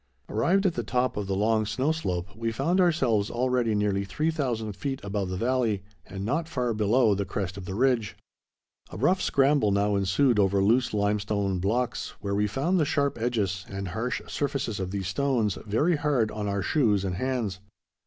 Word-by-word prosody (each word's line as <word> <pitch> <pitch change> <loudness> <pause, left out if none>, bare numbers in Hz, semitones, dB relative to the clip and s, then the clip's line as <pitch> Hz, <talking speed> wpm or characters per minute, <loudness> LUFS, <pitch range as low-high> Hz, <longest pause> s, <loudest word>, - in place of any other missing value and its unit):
Arrived 175 - +2
at 185 - +3
the 120 - -2
top 125 +3 0
of 105 -1 -3
the 95 - -1
long 110 +2 +2
snow 130 +8 0
slope, 90 - -2
we 115 +1 -2
found 165 +11 +1
ourselves 130 - +2
already 120 -2 +1
nearly 100 -1 +1
3000 120 - -2
feet 135 +7 -4
above 100 -2 -2
the 95 - -3
valley 115 -3 0 0.2
and 95 0 -6
not 150 +8 -1
far 125 -7 -1
below 110 +2 +3
the 100 0 -1
crest 95 -2 -4
of 95 -2 -8
the 95 0 -5
ridge. 120 -3 +1 0.7
A 90 - -8
rough 180 - +2
scramble 140 -7 +3
now 100 +1 +2
ensued 100 +5 +2
over 100 0 +3
loose 115 +6 +3
limestone 100 -2 0
blocks, 120 +6 -1
where 100 -1 -3
we 105 +1 +1
found 150 - 0
the - - +4
sharp 140 -3 0
edges, 100 -6 -1
and 100 -1 -5
harsh 115 +6 -3
surfaces 140 -7 -2
of 95 -1 -3
these 95 -1 -3
stones, 115 -2 0
very 150 +11 +2
hard 135 -7 +1
on 105 -1 -4
our 100 -1 -1
shoes 105 - +2
and 90 -2 -2
hands. 120 -7 -2
110 Hz, 185 wpm, -27 LUFS, 100-130 Hz, 0.7 s, the